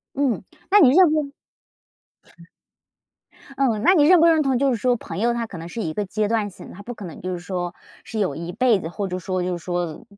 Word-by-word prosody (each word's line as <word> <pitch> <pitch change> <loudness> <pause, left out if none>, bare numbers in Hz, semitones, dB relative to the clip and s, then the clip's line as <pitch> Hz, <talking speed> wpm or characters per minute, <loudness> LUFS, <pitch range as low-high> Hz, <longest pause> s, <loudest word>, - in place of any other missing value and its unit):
嗯， 275 -3 0 0.3
那 415 - +7
你 275 -8 +7
认 340 +3 +6
不 315 - +1
认？ 280 -1 -7 2.3
嗯， 235 -6 +1
那 370 - +6
你 300 -5 +5
认 360 +1 +7
不 335 - +6
认 320 -2 +4
同 265 -3 +1
就 275 0 +2
是 245 - 0
说 245 +2 +1
朋 - - -8
友 235 +3 +2
他 235 -1 -3
可 185 -6 -9
能 165 - -8
是 225 - -6
一 155 -4 -3
个 210 - -1
阶 210 +2 -1
段 215 -1 -1
性， 180 - -12
他 200 - -11
不 245 - -7
可 205 - -10
能 170 -4 -9
就 185 +1 -4
是 175 - -5
说 175 -1 -4 0.3
是 225 - -7
有 200 -4 0
一 170 +2 -6
辈 230 -1 +2
子， 160 - -5
或 200 +3 -4
者 180 -1 -4
说 185 0 -3
就 180 -1 -2
是 - - -7
说 175 -3 -3
215 Hz, 265 characters per minute, -22 LUFS, 180-265 Hz, 2.3 s, 那